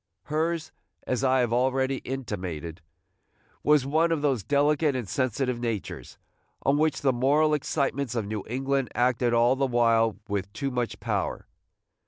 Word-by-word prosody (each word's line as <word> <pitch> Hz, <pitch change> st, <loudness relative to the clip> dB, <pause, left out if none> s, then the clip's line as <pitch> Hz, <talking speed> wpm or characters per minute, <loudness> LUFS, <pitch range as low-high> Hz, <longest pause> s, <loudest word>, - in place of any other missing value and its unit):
Hers, 160 Hz, +2 st, -1 dB, 0.3 s
as 130 Hz, +1 st, -1 dB
I 130 Hz, -1 st, +3 dB
have 120 Hz, -2 st, 0 dB
already 130 Hz, +2 st, +1 dB
intimated, 90 Hz, -, -5 dB, 0.8 s
was 150 Hz, -3 st, +4 dB
one 160 Hz, +4 st, +2 dB
of 155 Hz, -3 st, 0 dB
those 135 Hz, -6 st, +1 dB
delicate 145 Hz, -, +2 dB
and 125 Hz, -5 st, -3 dB
sensitive 125 Hz, +2 st, -1 dB
natures, 115 Hz, -4 st, -4 dB, 0.5 s
on 140 Hz, +2 st, +2 dB
which 155 Hz, -1 st, +1 dB
the 135 Hz, -2 st, +3 dB
moral 145 Hz, +5 st, +3 dB
excitements 140 Hz, -3 st, -1 dB
of 115 Hz, -3 st, -1 dB
New 105 Hz, 0 st, -4 dB
England 135 Hz, +1 st, -1 dB
acted 120 Hz, 0 st, +2 dB
all 120 Hz, +2 st, +4 dB
the 135 Hz, 0 st, +1 dB
while 115 Hz, -3 st, +2 dB
with 100 Hz, -1 st, -3 dB
too 140 Hz, -1 st, -3 dB
much 125 Hz, -2 st, -2 dB
power. -, -, -2 dB
130 Hz, 150 wpm, -27 LUFS, 115-140 Hz, 0.8 s, was